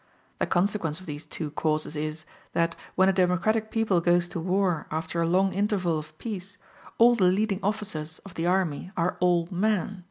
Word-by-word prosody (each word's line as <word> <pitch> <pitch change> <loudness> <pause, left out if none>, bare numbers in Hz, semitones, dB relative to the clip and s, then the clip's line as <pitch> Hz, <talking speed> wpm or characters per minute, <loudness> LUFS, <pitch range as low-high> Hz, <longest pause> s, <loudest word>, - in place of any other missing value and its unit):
The - - +1
consequence 175 -3 0
of 185 - -13
these 150 -2 -7
two 155 -3 -4
causes 155 0 -1
is, 155 +1 -4 0.3
that 165 0 +1 0.2
when 190 0 +5
a 195 - +4
democratic 190 +4 +2
people 215 -6 +1
goes 175 0 +3
to - - -4
war 180 -1 0
after 160 +2 -2
a 165 - +2
long 190 +3 +3
interval 190 -5 +1
of 155 0 -12
peace 200 -2 -6 0.4
all 240 +1 +7
the 210 -6 +3
leading 195 +2 +2
officers 165 -7 -3
of 195 - -10
the 165 +1 -2
army 180 -3 0
are 175 +1 0
old 175 -1 +2
men. 200 0 0
180 Hz, 185 wpm, -27 LUFS, 165-195 Hz, 0.4 s, all